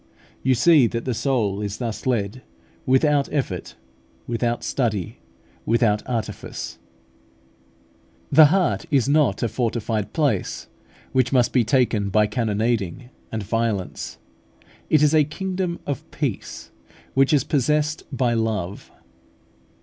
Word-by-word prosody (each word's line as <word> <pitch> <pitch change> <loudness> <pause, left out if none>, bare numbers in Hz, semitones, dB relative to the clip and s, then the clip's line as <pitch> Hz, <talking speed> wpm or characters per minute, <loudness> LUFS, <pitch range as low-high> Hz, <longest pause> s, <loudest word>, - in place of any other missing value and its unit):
You 130 0 +2
see 145 0 +5
that 115 +1 -4
the 130 - -1
soul 110 -6 0
is 105 0 -4
thus 115 0 -4
led, 115 -1 -1 0.5
without 140 +2 +3
effort, 115 - -3 0.5
without 120 0 -1
study, 105 -9 -2 0.4
without 115 -2 +2
artifice. 115 -3 -4 1.5
The 155 - +9
heart 185 +3 +1
is 135 -4 +2
not 140 -9 +2
a - - +2
fortified 110 -3 -2
place, 135 - -1 0.5
which 130 -2 +2
must 125 -3 +3
be 125 - +4
taken 110 -4 +1
by 105 +2 +3
cannonading 110 +1 -1 0.2
and 110 -2 -3
violence: 110 -3 -2 0.7
it 155 -1 +4
is 150 0 +4
a 155 -1 +5
kingdom 185 +3 -3
of 145 -4 -4
peace, - - -4 0.4
which 135 0 +3
is 145 -4 +3
possessed 150 +2 +1
by 125 -3 +1
love. 110 -5 -2
120 Hz, 120 wpm, -23 LUFS, 110-140 Hz, 1.5 s, The